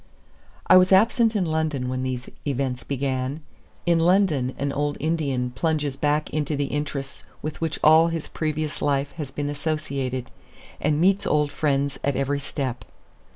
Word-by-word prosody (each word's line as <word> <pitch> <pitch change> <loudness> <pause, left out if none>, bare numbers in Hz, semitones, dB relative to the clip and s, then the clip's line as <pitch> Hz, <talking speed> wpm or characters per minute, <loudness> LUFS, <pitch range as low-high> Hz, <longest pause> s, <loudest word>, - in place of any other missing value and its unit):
I 185 - +7
was 185 +1 +5
absent 225 +3 +4
in 195 -4 +1
London 155 -5 -1
when 130 0 -2
these 130 -1 -3 0.2
events 130 -3 -2
began. 135 +1 -2 0.4
In 170 -1 +3
London 165 -7 +2
an 140 0 -2
old 145 0 -1
Indian 140 -6 -1
plunges 150 0 -1
back 150 +2 +1
into 150 -1 -1
the 145 0 0
interests 145 -2 -4 0.2
with 155 +1 -5
which 160 -2 -1
all 160 +2 +7
his 165 -2 -3
previous 155 -1 -3
life 140 0 +1
has 150 -5 -4
been 145 +2 -3
associated, 140 -4 -3 0.5
and 150 0 +1
meets 195 +3 +3
old 150 -1 +2
friends 140 -2 0
at 140 -1 +1
every 140 +1 0
step. 135 -3 -4
145 Hz, 155 wpm, -24 LUFS, 135-160 Hz, 0.5 s, I